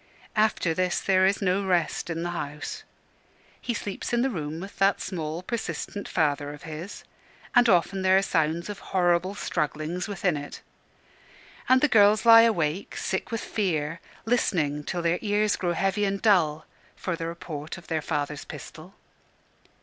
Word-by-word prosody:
After 215 Hz, -6 st, +2 dB
this 180 Hz, +1 st, 0 dB
there 190 Hz, -1 st, +3 dB
is 200 Hz, +1 st, 0 dB
no 190 Hz, +1 st, +1 dB
rest 175 Hz, -3 st, 0 dB
in 165 Hz, 0 st, -3 dB
the 175 Hz, -, -2 dB
house. 150 Hz, -3 st, -5 dB, 0.8 s
He 240 Hz, -, -2 dB
sleeps 205 Hz, -2 st, -4 dB
in 240 Hz, 0 st, +2 dB
the 265 Hz, -, +1 dB
room 155 Hz, -4 st, -4 dB
with 195 Hz, +3 st, -9 dB
that 195 Hz, 0 st, +3 dB
small, 165 Hz, -2 st, -4 dB
persistent 215 Hz, -2 st, -4 dB
father 145 Hz, -2 st, 0 dB
of 150 Hz, -, -16 dB
his, 165 Hz, +5 st, -7 dB, 0.5 s
and 245 Hz, -1 st, +5 dB
often 190 Hz, +1 st, +2 dB
there 190 Hz, 0 st, +5 dB
are 195 Hz, -, +3 dB
sounds 165 Hz, -1 st, 0 dB
of 205 Hz, -1 st, -6 dB
horrible 180 Hz, +1 st, +1 dB
strugglings 165 Hz, +1 st, -2 dB
within 195 Hz, -4 st, 0 dB
it. 145 Hz, 0 st, -7 dB, 1.1 s
And 260 Hz, 0 st, +6 dB
the 300 Hz, -, +5 dB
girls 210 Hz, -2 st, +5 dB
lie 230 Hz, 0 st, +10 dB
awake, 185 Hz, -6 st, 0 dB
sick 190 Hz, -, -2 dB
with 230 Hz, -1 st, -3 dB
fear, 165 Hz, -6 st, -1 dB, 0.3 s
listening, 155 Hz, -11 st, 0 dB
till 175 Hz, -1 st, -3 dB
their 170 Hz, +1 st, +1 dB
ears 210 Hz, 0 st, +1 dB
grow 175 Hz, -2 st, -1 dB
heavy 195 Hz, +3 st, +1 dB
and 195 Hz, 0 st, -1 dB
dull, 160 Hz, -8 st, +3 dB, 0.3 s
for 185 Hz, -, -3 dB
the 165 Hz, -1 st, -4 dB
report 160 Hz, -3 st, -6 dB
of 175 Hz, -, -13 dB
their 160 Hz, -2 st, -2 dB
father's 145 Hz, 0 st, -3 dB
pistol. 170 Hz, +5 st, -10 dB
180 Hz, 165 wpm, -26 LUFS, 160-200 Hz, 1.1 s, lie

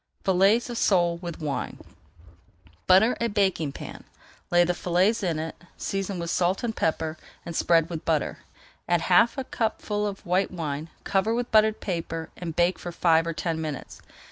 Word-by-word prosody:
FILLETS 195 Hz, +5 st, +3 dB
OF 240 Hz, -, -4 dB
SOLE 175 Hz, -3 st, +3 dB
WITH 170 Hz, -1 st, -7 dB
WINE 150 Hz, -3 st, -3 dB, 1.1 s
Butter 195 Hz, +6 st, +6 dB
a 235 Hz, -, +2 dB
baking 195 Hz, -8 st, +1 dB
pan, -, -, -9 dB, 0.5 s
lay 175 Hz, 0 st, +5 dB
the 175 Hz, +1 st, +1 dB
fillets 185 Hz, +6 st, +1 dB
in 170 Hz, -5 st, 0 dB
it, 160 Hz, +1 st, -4 dB, 0.2 s
season 195 Hz, -1 st, -3 dB
with 170 Hz, -1 st, -3 dB
salt 185 Hz, +4 st, +1 dB
and 225 Hz, -2 st, -2 dB
pepper, 160 Hz, 0 st, -1 dB, 0.3 s
and 170 Hz, -, -6 dB
spread 165 Hz, -1 st, +3 dB
with 165 Hz, -2 st, -6 dB
butter. 160 Hz, -3 st, 0 dB, 0.5 s
Add 175 Hz, -1 st, +3 dB
half 185 Hz, +10 st, +4 dB
a 270 Hz, -, -1 dB
cupful 210 Hz, -3 st, -2 dB
of 200 Hz, 0 st, -7 dB
white 185 Hz, +2 st, +1 dB
wine, 155 Hz, -3 st, -4 dB
cover 205 Hz, +4 st, +1 dB
with 245 Hz, 0 st, -2 dB
buttered 215 Hz, -1 st, +4 dB
paper, 165 Hz, -3 st, -4 dB
and 165 Hz, -3 st, -6 dB
bake 175 Hz, +1 st, +2 dB
for 175 Hz, -, -6 dB
five 165 Hz, -1 st, +3 dB
or 165 Hz, -, -1 dB
ten 160 Hz, 0 st, -2 dB
minutes. 150 Hz, -4 st, -6 dB
175 Hz, 170 wpm, -26 LUFS, 165-200 Hz, 1.1 s, Butter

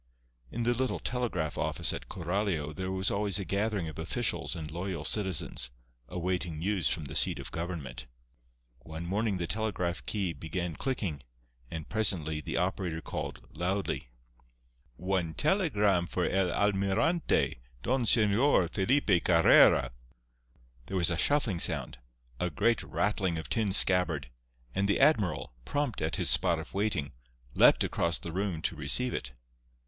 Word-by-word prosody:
In 120 Hz, -, -3 dB
the 120 Hz, +1 st, +2 dB
little 130 Hz, +1 st, -1 dB
telegraph 115 Hz, -11 st, -2 dB
office -, -, 0 dB
at -, -, -7 dB
Coralio 85 Hz, -4 st, -2 dB
there 95 Hz, +3 st, -4 dB
was 95 Hz, 0 st, 0 dB
always 100 Hz, -1 st, 0 dB
a 100 Hz, -, -3 dB
gathering 100 Hz, 0 st, -1 dB
of 80 Hz, -, -8 dB
officials -, -, -1 dB
and 75 Hz, -2 st, -6 dB
loyal 85 Hz, -2 st, -4 dB
citizens, 95 Hz, -, -1 dB, 0.4 s
awaiting 90 Hz, -2 st, -2 dB
news 90 Hz, -3 st, 0 dB
from 80 Hz, +2 st, -2 dB
the -, -, -7 dB
seat -, -, +2 dB
of -, -, -8 dB
government. 75 Hz, -8 st, -5 dB, 0.7 s
One 80 Hz, +6 st, -7 dB
morning 100 Hz, +2 st, 0 dB
the 85 Hz, -, -2 dB
telegraph 95 Hz, -3 st, -2 dB
key 95 Hz, -5 st, -1 dB
began 85 Hz, +3 st, -4 dB
clicking, 95 Hz, -, -3 dB, 0.5 s
and 80 Hz, -2 st, -6 dB
presently 80 Hz, -8 st, +1 dB
the -, -, -4 dB
operator 90 Hz, -2 st, -1 dB
called, -, -, -6 dB
loudly: 90 Hz, -5 st, -2 dB, 0.9 s
"One 90 Hz, -1 st, -2 dB
telegram 105 Hz, -, +2 dB
for 90 Hz, -, -1 dB
el 95 Hz, -1 st, +1 dB
Almirante, 100 Hz, -, +1 dB, 0.2 s
Don 130 Hz, -1 st, +1 dB
Señor 105 Hz, -, +4 dB
Felipe 100 Hz, -3 st, +2 dB
Carrera!" 85 Hz, -6 st, +6 dB, 1.0 s
There 95 Hz, -, -2 dB
was 85 Hz, -1 st, +2 dB
a -, -, +1 dB
shuffling 120 Hz, -, +2 dB
sound, 60 Hz, -, 0 dB, 0.4 s
a 90 Hz, -, 0 dB
great 115 Hz, +8 st, +1 dB
rattling 95 Hz, -4 st, -1 dB
of 80 Hz, -, -6 dB
tin 110 Hz, -4 st, +1 dB
scabbard, 90 Hz, -9 st, +3 dB, 0.4 s
and 100 Hz, +5 st, +1 dB
the 100 Hz, -, +2 dB
admiral, 120 Hz, -, +2 dB
prompt 145 Hz, -, -2 dB
at 80 Hz, +1 st, -1 dB
his -, -, 0 dB
spot -, -, +3 dB
of -, -, -8 dB
waiting, 100 Hz, -8 st, -1 dB, 0.4 s
leaped -, -, +6 dB
across 85 Hz, 0 st, 0 dB
the 85 Hz, -, -7 dB
room 90 Hz, -3 st, -2 dB
to -, -, 0 dB
receive 80 Hz, -, +1 dB
it. 65 Hz, 0 st, -4 dB
95 Hz, 145 wpm, -30 LUFS, 80-105 Hz, 1.0 s, Carrera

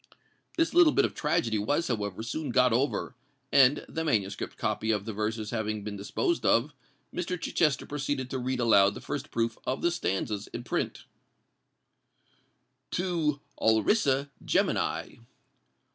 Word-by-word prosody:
This 330 Hz, -1 st, +2 dB
little 335 Hz, -3 st, +6 dB
bit -, -, +4 dB
of -, -, -3 dB
tragedy 115 Hz, -8 st, 0 dB
was, 145 Hz, +10 st, 0 dB
however, 105 Hz, -3 st, -2 dB
soon 150 Hz, +5 st, -4 dB
got 125 Hz, -1 st, +4 dB
over; 130 Hz, +2 st, 0 dB, 0.4 s
and, 135 Hz, 0 st, +5 dB
the 160 Hz, -, -3 dB
manuscript 105 Hz, -10 st, -1 dB
copy 110 Hz, -, -1 dB
of 105 Hz, -2 st, +1 dB
the 110 Hz, -, -4 dB
verses 110 Hz, +1 st, -2 dB
having 110 Hz, -2 st, -2 dB
been 105 Hz, 0 st, -5 dB
disposed 215 Hz, -, -1 dB
of, 135 Hz, +6 st, +3 dB, 0.4 s
Mr. 180 Hz, 0 st, -3 dB
Chichester 150 Hz, -5 st, +1 dB
proceeded 140 Hz, -2 st, -2 dB
to 130 Hz, -, -2 dB
read 130 Hz, 0 st, -2 dB
aloud 100 Hz, -4 st, +5 dB
the -, -, -6 dB
first 145 Hz, 0 st, -5 dB
proof 115 Hz, -1 st, -1 dB
of 130 Hz, -, -3 dB
the 175 Hz, -, +3 dB
stanzas 105 Hz, -, -2 dB
in 120 Hz, -, -7 dB
print:— -, -, -3 dB, 1.8 s
TO 165 Hz, -5 st, -1 dB, 0.2 s
ALRISSA 135 Hz, -, +2 dB
GEMINI. -, -, 0 dB
125 Hz, 145 wpm, -28 LUFS, 110-150 Hz, 1.8 s, little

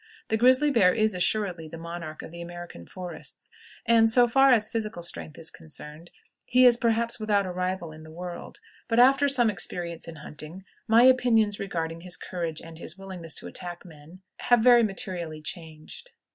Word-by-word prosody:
The 220 Hz, -, +2 dB
grizzly 260 Hz, +5 st, +4 dB
bear 195 Hz, -8 st, +4 dB
is 215 Hz, -2 st, +2 dB
assuredly 180 Hz, -2 st, -1 dB
the 165 Hz, -, -9 dB
monarch 170 Hz, -1 st, -7 dB
of -, -, -9 dB
the 170 Hz, 0 st, -9 dB
American 175 Hz, -, -9 dB
forests, 180 Hz, -, -9 dB, 0.3 s
and, 225 Hz, -1 st, +5 dB
so 240 Hz, +2 st, +5 dB
far 270 Hz, +3 st, +5 dB
as 220 Hz, -4 st, +4 dB
physical 215 Hz, -7 st, -4 dB
strength 160 Hz, -2 st, -4 dB
is 165 Hz, -1 st, -4 dB
concerned, 160 Hz, 0 st, -9 dB, 0.4 s
he 255 Hz, +1 st, +5 dB
is 245 Hz, -1 st, +7 dB
perhaps 230 Hz, 0 st, 0 dB
without 205 Hz, -2 st, +1 dB
a 185 Hz, -, -4 dB
rival 180 Hz, -2 st, -3 dB
in 155 Hz, 0 st, -12 dB
the 160 Hz, -, -12 dB
world; 175 Hz, -, -8 dB, 0.3 s
but, 230 Hz, -, 0 dB
after 270 Hz, +3 st, +6 dB
some 245 Hz, -5 st, +3 dB
experience 175 Hz, -3 st, -5 dB
in 165 Hz, -, -8 dB
hunting, 155 Hz, +4 st, -9 dB, 0.2 s
my 225 Hz, +2 st, +6 dB
opinions 235 Hz, -5 st, +4 dB
regarding 165 Hz, -4 st, -4 dB
his 180 Hz, 0 st, -4 dB
courage 165 Hz, -3 st, -5 dB
and 165 Hz, -1 st, -11 dB
his 170 Hz, +2 st, -7 dB
willingness 185 Hz, -4 st, -8 dB
to -, -, -5 dB
attack 175 Hz, 0 st, -6 dB
men 165 Hz, +3 st, -15 dB
have 240 Hz, -2 st, +3 dB
very 240 Hz, 0 st, +7 dB
materially 180 Hz, -6 st, -3 dB
changed. 160 Hz, -, -7 dB
180 Hz, 180 wpm, -26 LUFS, 165-225 Hz, 0.4 s, is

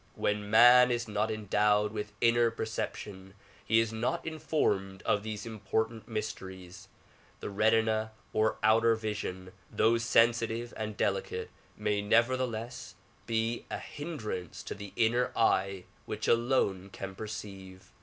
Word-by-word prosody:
When 105 Hz, 0 st, -1 dB
man 120 Hz, +3 st, +8 dB
is 120 Hz, -1 st, -1 dB
not 105 Hz, +1 st, -1 dB
endowed 105 Hz, -1 st, +1 dB
with 105 Hz, -1 st, -4 dB
inner 115 Hz, 0 st, +4 dB
perception 105 Hz, -4 st, -5 dB, 0.3 s
he 110 Hz, +1 st, +3 dB
is 115 Hz, -1 st, 0 dB
not 125 Hz, +10 st, -2 dB
informed 105 Hz, -12 st, -1 dB
of 105 Hz, -, +1 dB
these 110 Hz, 0 st, -5 dB
important 110 Hz, 0 st, -2 dB
mysteries. 95 Hz, -5 st, -6 dB, 0.5 s
The -, -, -5 dB
retina 110 Hz, +1 st, +2 dB, 0.2 s
of 110 Hz, 0 st, +2 dB
outer 115 Hz, +1 st, +5 dB
vision 105 Hz, -4 st, -5 dB, 0.2 s
though 115 Hz, +1 st, +3 dB
sensitive 115 Hz, 0 st, +2 dB
and 110 Hz, -1 st, -5 dB
delicate -, -, -2 dB, 0.3 s
may 105 Hz, -1 st, 0 dB
nevertheless 120 Hz, 0 st, 0 dB, 0.3 s
be 115 Hz, +1 st, -1 dB
a -, -, -3 dB
hindrance 135 Hz, -, -6 dB
to -, -, -5 dB
the 100 Hz, -1 st, -9 dB
inner 120 Hz, +2 st, +2 dB
eye 95 Hz, -4 st, +2 dB, 0.2 s
which -, -, -4 dB
alone 115 Hz, -6 st, +1 dB
can 95 Hz, 0 st, -7 dB
perceive. 95 Hz, -3 st, -8 dB
110 Hz, 125 wpm, -30 LUFS, 105-115 Hz, 0.5 s, man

